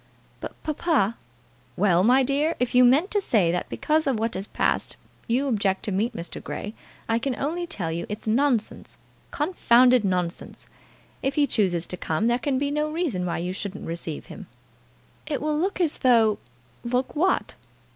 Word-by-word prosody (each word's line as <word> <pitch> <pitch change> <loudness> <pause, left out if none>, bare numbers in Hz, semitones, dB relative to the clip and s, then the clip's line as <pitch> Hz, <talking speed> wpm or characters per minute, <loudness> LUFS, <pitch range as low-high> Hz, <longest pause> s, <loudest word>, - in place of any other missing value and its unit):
"But, - - -7
papa 305 - +1 0.3
" - - -33
"Well, 180 -3 +3
my 255 +5 +5
dear! 285 +5 +1
If 250 -1 0
you 250 0 +6
mean 270 +9 +5
to 410 - 0
say 200 - +2
that 175 - -2
because 310 0 0
of 265 -4 +1
what 225 +1 -1
has 190 +2 -4
passed - - -1 0.3
you 255 +5 +1
object 200 -6 0
to 210 - -2
meet 220 +5 -1
Mr. 170 - -7
Grey, 210 - -5 0.3
I 225 0 +1
can 260 +1 -2
only 345 +5 -3
tell 170 - -3
you 170 +1 -4
it's 210 +1 -6
nonsense, 235 0 0 0.3
confounded 255 - +3
nonsense. 180 -3 -3 0.6
If 270 - -1
he 295 -2 +4
chooses 180 -10 0
to 180 - -7
come 165 +4 -1
there 240 +1 +2
can 270 0 0
be 280 +1 -1
no 300 +1 0
reason 300 - -2
why 170 - -2
you 180 +2 -3
shouldn't 200 +1 -6
receive 165 -2 -5
him." - - -10 0.8
"It 290 -4 -1
will 305 0 -1
look 380 +4 -1
as 330 -4 +2
though 225 -4 +4 0.2
" 125 -1 -33
"Look 250 +4 -1
what?" 365 +5 +1
240 Hz, 185 wpm, -25 LUFS, 195-290 Hz, 0.8 s, you